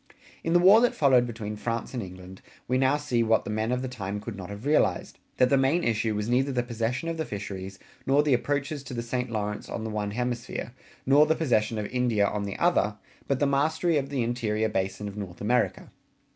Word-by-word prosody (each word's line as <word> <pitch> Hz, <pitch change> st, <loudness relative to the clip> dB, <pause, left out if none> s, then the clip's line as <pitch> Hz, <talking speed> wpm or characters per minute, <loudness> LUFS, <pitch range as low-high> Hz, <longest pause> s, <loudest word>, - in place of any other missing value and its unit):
In 165 Hz, -, 0 dB
the 175 Hz, -, +6 dB
war 195 Hz, +5 st, +7 dB
that 245 Hz, -, +2 dB
followed 130 Hz, -4 st, +4 dB
between 110 Hz, -2 st, -5 dB
France 115 Hz, +3 st, -3 dB
and 125 Hz, -, -2 dB
England, 95 Hz, -1 st, -10 dB, 0.3 s
we 130 Hz, +1 st, +1 dB
now 135 Hz, +2 st, +3 dB
see 145 Hz, -5 st, 0 dB
what 115 Hz, -1 st, +3 dB
the 105 Hz, -, -3 dB
men 110 Hz, +2 st, -1 dB
of 125 Hz, +1 st, -1 dB
the -, -, -2 dB
time 105 Hz, -5 st, -5 dB
could 105 Hz, +1 st, -7 dB
not 95 Hz, -1 st, -8 dB
have 100 Hz, +4 st, -8 dB
realized: 110 Hz, -11 st, +1 dB, 0.2 s
that 125 Hz, +1 st, +4 dB
the 140 Hz, -, +5 dB
main 145 Hz, +6 st, +2 dB
issue 110 Hz, -1 st, 0 dB
was 105 Hz, +1 st, -2 dB
neither 130 Hz, +3 st, +2 dB
the 125 Hz, -2 st, 0 dB
possession 120 Hz, +4 st, -2 dB
of 165 Hz, 0 st, -2 dB
the 160 Hz, -, -1 dB
fisheries 100 Hz, -4 st, -6 dB, 0.3 s
nor 140 Hz, +2 st, +4 dB
the 150 Hz, -2 st, +2 dB
approaches 145 Hz, +3 st, -1 dB
to 130 Hz, -2 st, -8 dB
the 115 Hz, -, -3 dB
St. 125 Hz, +1 st, -2 dB
Lawrence 105 Hz, -2 st, -3 dB
on 110 Hz, -, -4 dB
the 110 Hz, -, -4 dB
one 105 Hz, -1 st, -2 dB
hemisphere, 120 Hz, +1 st, -3 dB, 0.3 s
nor 145 Hz, +3 st, +6 dB
the 160 Hz, -, +3 dB
possession 115 Hz, -8 st, +1 dB
of 105 Hz, -, -2 dB
India 120 Hz, -3 st, +1 dB
on 100 Hz, 0 st, -2 dB
the 100 Hz, -, -5 dB
other, 105 Hz, -12 st, +2 dB, 0.3 s
but 135 Hz, -1 st, 0 dB
the 145 Hz, -, +3 dB
mastery 155 Hz, +4 st, +1 dB
of 135 Hz, -, -5 dB
the 135 Hz, -4 st, -1 dB
interior 110 Hz, -2 st, -1 dB
basin 95 Hz, +1 st, -2 dB
of 100 Hz, -, -7 dB
North 95 Hz, -4 st, -7 dB
America. 120 Hz, +4 st, 0 dB
120 Hz, 225 wpm, -27 LUFS, 105-135 Hz, 0.3 s, war